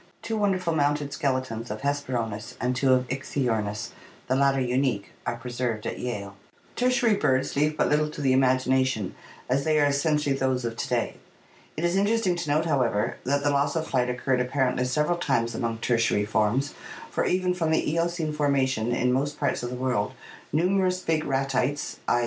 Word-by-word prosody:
Two 225 - -2
wonderful 190 -5 +1
mounted 145 -1 0
skeletons 130 -6 -2
of 105 +1 -5
Hesperornis 125 -7 -2
and 125 0 0
two 130 +1 +2
of 130 -1 +3
Ichthyornis, 120 -6 -2 0.3
the 130 - 0
latter 135 0 +3
unique, 125 -5 0 0.2
are - - 0
preserved 120 -2 -3
at - - -4
Yale. 100 -5 -4 0.4
Tertiary 245 -2 +3
birds 130 -8 +1
leave 150 +2 +1
but - - +2
little 150 +1 +2
to 150 - -9
the 135 -3 +2
imagination, 130 -4 +2 0.3
as 135 +2 +1
they 155 0 +2
are 145 - +4
essentially 145 0 +1
those 130 -2 0
of 115 -1 -3
to - - -2
day. - - -1 0.6
It 160 - -2
is 175 +1 +2
interesting 205 -2 +2
to 170 -3 -3
note, 155 +3 +2
however, 120 -8 +1
that 140 +2 +1
the 145 - +2
loss 140 +1 +1
of 160 -1 0
flight 125 -4 0
occurred 125 +1 0
apparently 125 0 0
several 150 +6 +1
times 115 -7 0
among 115 -1 -2
Tertiary 115 -3 +1
forms, 110 +6 +1 0.4
for - - 0
even 180 0 +1
from 170 -3 -1
the 160 - +1
Eocene 165 0 0
formation 135 -6 +1
in 125 +1 +2
most 145 +3 -1
parts 140 -2 0
of 120 - -3
the 125 - -5
world 125 -5 -1 0.4
numerous 185 +3 +2
big 160 -2 0
Ratites 135 +1 -1
(*". - - -31
135 Hz, 180 wpm, -26 LUFS, 125-150 Hz, 0.6 s, are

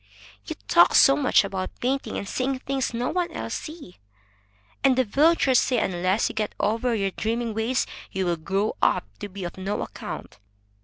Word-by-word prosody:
"You - - -4
talk 175 +1 +5
so 275 - +7
much 280 -6 +3
about 190 -1 -5
painting, 270 +2 -1
and 200 - -5
seeing 260 +5 -1
things 270 0 -2
no 240 +1 -2
one 355 -1 -1
else - - -4
sees, 305 - -8 0.8
that 270 -1 +4
the 260 - +3
villagers 275 +2 +3
say 250 - +1
unless 185 +1 +1
you - - -5
get 215 -1 -3
over 230 +3 +1
your 195 -2 0
dreaming 230 +3 -2
ways, 225 +4 0 0.3
you 190 -1 -1
will 175 -1 0
grow 195 +6 -1
up - - +2
to 205 - -6
be 195 0 -7
of 175 +1 -6
no 195 +2 -2
account. - - -8
225 Hz, 185 wpm, -25 LUFS, 195-260 Hz, 0.8 s, so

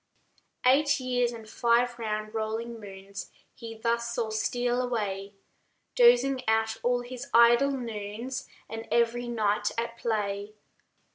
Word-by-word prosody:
H4yy4/ 255 - +8
Eight 285 0 +2
years 245 -2 0
and 225 -2 -9
five 240 +2 +1
round 215 -1 -3
rolling 225 +1 -3
moons 195 -1 -9 0.2
He 230 -2 -9
thus 235 +1 -1
saw 225 -2 -1
steal 245 +3 0
away, 205 -5 -3 0.6
Dozing 475 - +5
out 220 0 +2
all 245 0 +1
his 245 0 -8
idle 235 +4 +6
noons, 235 -1 -5 0.2
And 225 0 -7
every 235 +1 +2
night 210 -3 +1
at 230 0 -3
play. 210 -2 -2
235 Hz, 130 wpm, -28 LUFS, 215-245 Hz, 0.6 s, H4yy4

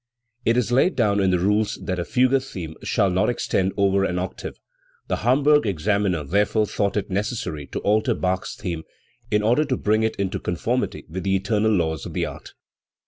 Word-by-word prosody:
It 115 +1 +3
is 125 -1 +1
laid 135 +9 +3
down 105 -4 +2
in 95 -1 +3
the 90 - +3
rules 105 +4 +1
that 95 -2 -2
a - - 0
fugue 130 +1 +3
theme 90 -11 -7
shall 100 -2 +1
not 95 +5 +2
extend 95 -5 0
over 100 -1 +3
an 90 -2 -1
oc 95 +1 -3
tave. - - -8 0.5
The - - 0
Hamburg 145 +1 +3
examiner 100 -2 0
therefore 105 +7 +1
thought 100 0 -1
it 105 0 -3
ne 95 - +2
cessary 85 - -5
to - - -3
alter 110 +2 +2
Bach's 95 0 -2
theme 85 -6 -4 0.5
in 105 0 +1
order 120 +8 +3
to 130 -3 -1
bring 110 +1 +1
it 110 0 0
into 95 0 -2
conformity 120 +10 -2
with 90 +4 -5
the 95 +2 +1
eternal 105 +3 +1
laws 80 -7 0
of - - -8
the - - 0
art. - - -9
100 Hz, 200 wpm, -23 LUFS, 95-110 Hz, 0.5 s, It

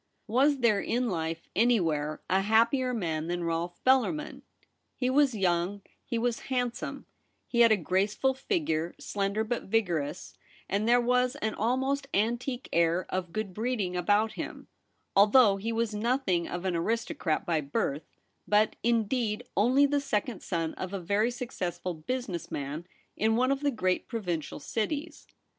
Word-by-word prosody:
Was 265 +4 +2
there 215 -4 +4
In 245 -1 0
life 165 -1 -3
anywhere 165 -10 +1
a 190 +1 +2
happier 230 +5 +3
man 165 -9 -2
than 175 0 -2
Rolfe 170 +1 -2
Bellarmin? 265 +4 +2 0.5
He 255 -1 0
was 275 -3 +3
young, 185 +1 0 0.2
he 235 - -3
was 235 0 0
handsome; 245 -2 -2 0.4
he 235 - -1
had 230 -1 +7
a 215 - +5
graceful 200 - +1
figure, 260 - -1
slender 200 +2 -1
but 235 +2 -3
vigorous, 175 -7 -1 0.3
and 205 +4 0
there 245 +1 +6
was 250 +2 +2
an 220 -7 -2
almost 265 +5 0
antique 240 +4 -1
air 170 +2 +2
of 185 -2 -3
good 215 0 -3
breeding 215 -4 -1
about 205 +5 +2
him, - - -7 0.5
although 205 +1 +6
he 220 +4 -3
was 230 -1 -1
nothing 210 -5 0
of 175 +1 -5
an 185 -2 0
aristocrat 220 - -1
by 165 -4 +1
birth, 140 +1 -3 0.3
but, 210 +1 +3
indeed, 235 0 0
only 255 +8 +4
the 285 0 +1
second 220 -4 -2
son 165 -3 -2
of 185 +1 -4
a 195 - -2
very 200 +6 +1
successful 185 -8 -4
business 180 +1 -4
man 145 +5 -5 0.3
in 220 +1 +2
one 255 +3 +2
of 275 - +1
the 290 0 +1
great 185 -8 0
provincial 180 - -3
cities. 235 - -3
215 Hz, 150 wpm, -29 LUFS, 175-245 Hz, 0.5 s, had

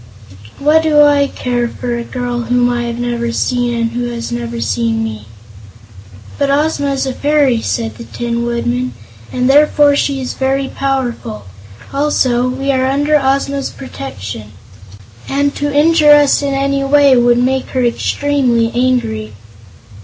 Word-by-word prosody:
"What 300 +3 +3
do 300 -2 +4
I 285 -1 +4
care 245 -3 -2
for 240 0 -4
a 235 - -4
girl 245 -1 -4
whom 245 +1 +1
I 240 0 -2
have 235 0 -4
never 240 -1 -2
seen 245 0 0
and 230 0 -1
who 245 +1 -3
has 235 -1 -5
never 120 -1 -4
seen 110 0 -1
me?" 110 -1 -6 1.1
"But 280 -1 +1
Ozma 285 0 +1
is 270 - -1
a 265 - -2
fairy," 285 -5 +1
said 110 - -3
the 115 - -8
Tin 235 - -3
Woodman, 240 +1 -2 0.4
"and 250 0 0
therefore 290 +1 +4
she 280 -1 0
is 255 - -4
very 270 +1 -1
powerful. 250 - -3 0.5
Also, 255 -4 +1
we 270 +2 -1
are 260 -1 +1
under 290 +3 +1
Ozma's 275 0 0
protection, 105 - -8 0.8
and 285 +1 0
to 290 0 -2
injure 300 +1 +5
us 290 -1 +4
in 280 -1 -1
any 275 0 0
way 280 -1 +4
would 240 0 +3
make 260 +2 0
her 255 -2 -1
extremely 240 -2 0
angry." 235 - -1
255 Hz, 155 wpm, -15 LUFS, 235-280 Hz, 1.1 s, injure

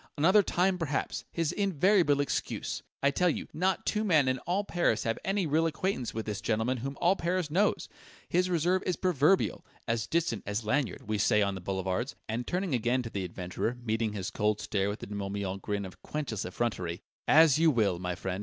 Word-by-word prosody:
"'Another 185 +8 +6
time, 185 0 +1
perhaps' 150 -4 -2
his 165 -2 0
invariable 185 -5 +3
excuse! 145 - -2 0.2
I 140 - +4
tell 180 +5 +2
you, - - -3
not 185 +4 0
two 215 0 0
men 155 -10 +4
in 130 0 +1
all 190 +4 +1
Paris 175 - +1
have 115 0 -1
any 195 -1 0
real 160 +2 +2
acquaintance 165 - -2
with 110 0 -4
this 105 -2 -4
gentleman 115 +4 0
whom 135 +3 -5
all 175 +3 +4
Paris 175 -3 -1
knows! 200 +6 +1 0.4
His 180 +1 +1
reserve 180 +2 +2
is 180 - +1
proverbial 180 0 +2 0.2
'as 115 -1 -1
distant 160 - 0
as 105 +2 -2
Lanyard,' 110 -4 -1
we 110 -1 -1
say 105 0 +4
on 100 -1 0
the 95 - -6
boulevards!" 95 +6 -2
And 115 +2 -3
turning 180 -3 -1
again 125 +1 +1
to 115 - -7
the 100 - -3
adventurer, 90 +6 -3
meeting 110 -1 -1
his 95 -3 -4
cold 105 -1 0
stare 100 -2 -1
with 105 - -5
the - - -5
De 105 - -8
Morbihan 100 -1 -3
grin 100 0 -2
of 95 - -11
quenchless 140 -9 -4
effrontery 90 -4 -3 0.2
"As 155 -2 +6
you 165 0 +5
will, 105 - +2
my 90 -1 -3
friend!" 95 0 -4
130 Hz, 200 wpm, -30 LUFS, 105-170 Hz, 0.4 s, Another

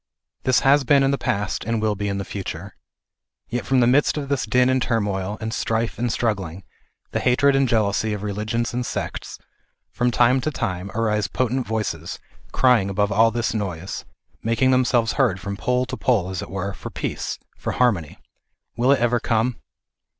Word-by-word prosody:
This 130 0 +4
has 140 +1 +5
been 140 +1 +4
in 135 - +3
the 140 - +1
past, 105 -5 -1
and 115 0 -1
will 110 -1 +1
be 105 0 -3
in 100 -1 -1
the 100 - -3
future. 95 -1 -6 0.8
Yet 120 -4 -3
from 130 -1 +3
the - - +5
midst 135 +5 +3
of 140 -2 -4
this 140 -2 0
din 125 0 +4
and 130 0 +2
turmoil, 105 -4 -1
and 110 0 -4
strife, 115 +1 -1
and 120 0 0
struggling, 100 -7 -2 0.5
the - - 0
hatred 135 +3 +3
and 135 -2 +2
jealousy 110 -1 +1
of 105 -1 -5
religions 110 +4 -2
and 125 +1 -1
sects, - - -5 0.5
from 125 - +1
time 125 +2 +3
to 155 - -1
time, 100 -9 -3
arise 105 -2 +1
potent 130 +2 -1
voices, 110 -1 -3 0.3
crying 125 -6 +3
above 105 +1 0
all 110 +3 +5
this 120 +1 -1
noise, 95 -4 -4 0.4
making 115 +3 +2
them 130 0 +4
selves 115 -3 +2
heard 120 -10 +2
from 100 +2 -4
pole 125 +4 0
to 130 0 -5
pole, 100 -8 +1
as 95 - -3
it - - -7
were, 95 +1 -3
for - - -8
peace, - - -4 0.2
for - - -4
harmony. 100 -12 +1 0.6
Will 125 +4 +3
it 140 - +4
ever 120 +1 +2
come 115 +1 0
115 Hz, 190 wpm, -23 LUFS, 100-125 Hz, 0.8 s, has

